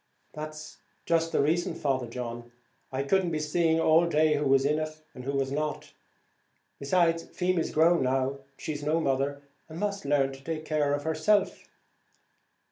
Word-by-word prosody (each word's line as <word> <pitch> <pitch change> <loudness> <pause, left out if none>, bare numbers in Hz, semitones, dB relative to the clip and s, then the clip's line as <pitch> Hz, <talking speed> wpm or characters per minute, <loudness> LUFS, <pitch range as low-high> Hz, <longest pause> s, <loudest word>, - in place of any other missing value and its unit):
"That's 155 0 -8 0.3
just 165 0 +1
the - - +2
reason, 170 +3 0
Father 135 -5 -1
John, 120 0 -6 0.4
I 135 +1 -1
couldn't 185 +5 +2
be 160 - -1
seeing 160 +2 +1
all 165 +1 +4
day 155 -1 +3
who 150 0 0
was 135 0 +4
in 150 +2 +2
it 155 0 -5
and 125 -1 -10
who 140 - -2
was 135 -1 0
not; 150 +1 -3 0.9
besides, 165 +3 +2
Feemy's 180 -2 -1
grown 165 +2 +4
now; 130 +1 0 0.2
she's 150 -2 -5
no 155 +3 +1
mother, 140 -1 -1 0.3
and 160 - -8
must 200 -1 -2
learn 140 -1 +2
to 155 +4 -5
care 150 -2 0
for - - -11
herself." 190 +6 +1
155 Hz, 160 wpm, -28 LUFS, 140-165 Hz, 0.9 s, all